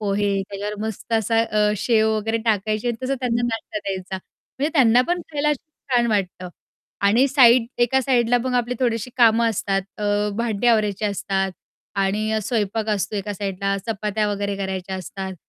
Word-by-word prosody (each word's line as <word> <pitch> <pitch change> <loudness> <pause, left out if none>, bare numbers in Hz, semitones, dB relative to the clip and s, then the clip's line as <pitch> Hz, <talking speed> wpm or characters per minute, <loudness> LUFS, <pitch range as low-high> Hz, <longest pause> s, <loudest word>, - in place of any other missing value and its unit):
पोहे. 200 -1 0
त्याच्यावर 205 +1 -4
मस्त 220 +1 -7
असा 225 +1 +2
अ, 210 -1 +1
शेव 220 +1 +2
वगैरे 225 +2 -1
टाकायचे 215 +1 0
आणि 235 - -1
तसं 270 +1 0
त्यांना 240 -1 0
नाश्ता 225 -2 -4
द्यायचा. 190 -1 -4 0.4
म्हणजे 290 +3 +1
त्यांना 245 -6 +5
पण 350 0 +1
खायला 295 +1 0
अशी 300 +2 -2 0.2
छान 240 -1 +3
वाटतं. 185 -3 -1 0.6
आणि 235 +7 +4
साईड 250 -3 +6
एका 245 +2 +3
साईडला 245 -2 +2
मग 255 -1 -1
आपली 245 0 0
थोडीशी 235 -1 0
कामं 230 -1 +5
असतात. 195 -2 -1 0.2
अ, 205 0 +1
भांडे 230 0 -1
आवरायचे 215 -3 +2
असतात 195 -1 -1 0.5
आणि 215 +3 0
स्वयंपाक 220 -1 -1
असतो 205 0 -1
एका 205 +1 -3
साईडला. 195 0 -2
चपात्या 210 -1 -1
वगैरे 200 0 -2
करायच्या 190 -1 -4
असतात. 190 +1 -6
215 Hz, 165 wpm, -22 LUFS, 200-235 Hz, 0.6 s, साईड